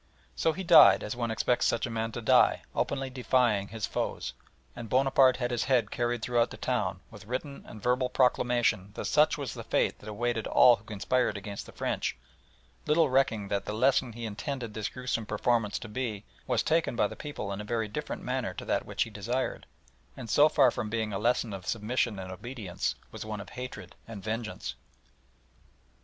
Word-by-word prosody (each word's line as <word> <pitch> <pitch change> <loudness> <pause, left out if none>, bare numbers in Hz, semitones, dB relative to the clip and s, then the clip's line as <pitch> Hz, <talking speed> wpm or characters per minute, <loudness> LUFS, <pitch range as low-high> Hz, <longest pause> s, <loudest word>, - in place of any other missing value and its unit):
So 160 - +2
he 190 +4 -5
died 165 -3 +8
as 105 - -4
one 120 -1 -2
expects 115 +2 +1
such 115 - +1
a 120 - -5
man 115 0 -2
to 120 - -5
die, - - +4
openly 135 -1 -1
defying 125 -5 +2
his 110 -1 -4
foes, - - -3 0.4
and 120 -2 -7
Bonaparte 130 +1 +4
had 125 -1 -2
his 120 -2 0
head 125 -6 +2
carried 120 -1 -1
through 120 -1 +3
the - - -10
town, 100 -8 -1
with 105 -2 -12
written 140 +3 -4
and 105 - -11
verbal 125 +1 +1
proclamation 120 -5 +2
that - - -4
such 150 +1 +3
was 140 -5 -4
the - - -7
fate - - 0
that 105 - -9
awaited 115 +1 -1
all 120 -2 +6
who 100 - -20
conspired 110 +2 0
against 100 0 -7
the - - -11
French, - - -2 0.7
little 155 -2 +3
recking 115 -6 +2
that 100 -1 -1
the 105 - -4
lesson 125 +1 +2
he 120 +1 -6
intended 115 +1 -4
this 110 -1 -3
gruesome 125 -4 -3
performance 105 0 +1
to - - -8
be 110 -2 -4 0.2
was - - +1
taken 160 -5 +1
by - - +3
the - - -4
people 145 -9 -5
in 100 - -5
a - - -6
very 110 +1 -1
different 105 - -5
manner - - -2
to - - -7
that - - -1
which - - 0
he 115 - -9
desired, 120 +6 -3 0.5
and 115 - -6
so 150 +1 +6
far 135 -5 +5
from 105 - -4
being 110 -1 -2
a 95 - -2
lesson 115 -1 +1
of 95 -2 -8
submission 115 0 0
and 95 -1 -6
obedience, 105 -2 -4 0.2
was - - -7
one 110 -1 -5
of 100 - -9
hatred 125 0 -7
and 110 -4 -8
vengeance. 110 - -4
115 Hz, 200 wpm, -29 LUFS, 105-125 Hz, 0.7 s, died